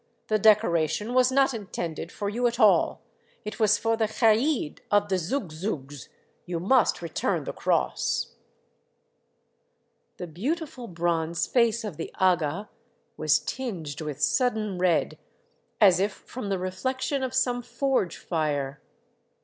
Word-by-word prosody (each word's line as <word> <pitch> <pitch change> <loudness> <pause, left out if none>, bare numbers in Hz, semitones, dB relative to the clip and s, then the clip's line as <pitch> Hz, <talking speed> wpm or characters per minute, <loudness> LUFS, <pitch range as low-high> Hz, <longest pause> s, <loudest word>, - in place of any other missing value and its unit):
The 215 0 +2
decoration 205 -1 +3
was 255 0 +4
not 270 0 +3
intended 180 -6 -5
for 205 - -4
you 240 +4 +1
at 235 +1 -3
all. 215 -3 +4 0.4
It 210 - -6
was 210 -1 +4
for 225 +1 +1
the 220 -1 +1
kaid 225 - +1
of 205 0 +2
the 190 - +2
Zoug 190 - -2
Zougs. 145 - -5 0.4
You 175 -1 -2
must 210 0 +2
return 165 - -1
the - - -5
cross. 60 0 0 0.9
" - - -47
The - - -5
beautiful 250 - -4
bronze 170 -2 -1
face 235 -2 +2
of 200 -8 -6
the 165 - -5
aga 180 +1 +1 0.4
was - - +3
tinged 170 - -5
with 150 -3 -5
sudden 215 -7 +1
red, 180 -2 +1 0.6
as 190 -5 +6
if 200 +1 +1
from 235 -1 -8
the 195 - 0
reflection 260 +9 -2
of 260 0 -3
some 245 -1 +1
forge 245 - -1
fire. 150 -4 -2
205 Hz, 140 wpm, -26 LUFS, 170-240 Hz, 0.9 s, as